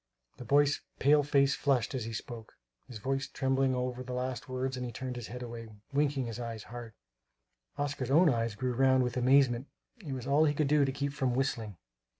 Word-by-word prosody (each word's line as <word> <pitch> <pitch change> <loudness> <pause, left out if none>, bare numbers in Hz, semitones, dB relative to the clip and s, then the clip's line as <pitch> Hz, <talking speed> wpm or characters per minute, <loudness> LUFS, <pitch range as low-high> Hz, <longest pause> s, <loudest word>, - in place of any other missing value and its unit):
The 125 - -9
boy's 145 +3 +3 0.2
pale 145 +2 +5
face 140 -1 +3
flushed 135 -5 +1
as 125 -4 -3
he 115 - -5
spoke; 115 0 -7 0.3
his 120 - -8
voice 135 +5 -2
trembled 135 0 +1
over 125 0 -2
the 125 0 -6
last 130 +2 -3
words 130 +1 -2
and 125 - -4
he 120 - -4
turned 130 +2 -5
his 120 -3 -6
head 125 +1 -7
away, 115 -1 -7 0.3
winking 140 -2 +1
his 115 0 -5
eyes 115 -3 -5
hard. 120 -2 -9 0.8
Oscar's 145 -3 -2
own 165 +6 +6
eyes 115 -5 +1
grew 130 +2 -1
round 130 +1 +4
with 125 -1 -2
amazement; 130 0 +3 0.4
it 145 -5 -5
was 125 -2 -5
all 145 +3 +4
he 145 -1 +1
could 150 - +1
do 145 0 +4
to 135 - -1
keep 140 +1 -3
from 130 -4 0
whistling. 115 -7 -2
130 Hz, 205 wpm, -31 LUFS, 120-140 Hz, 0.8 s, own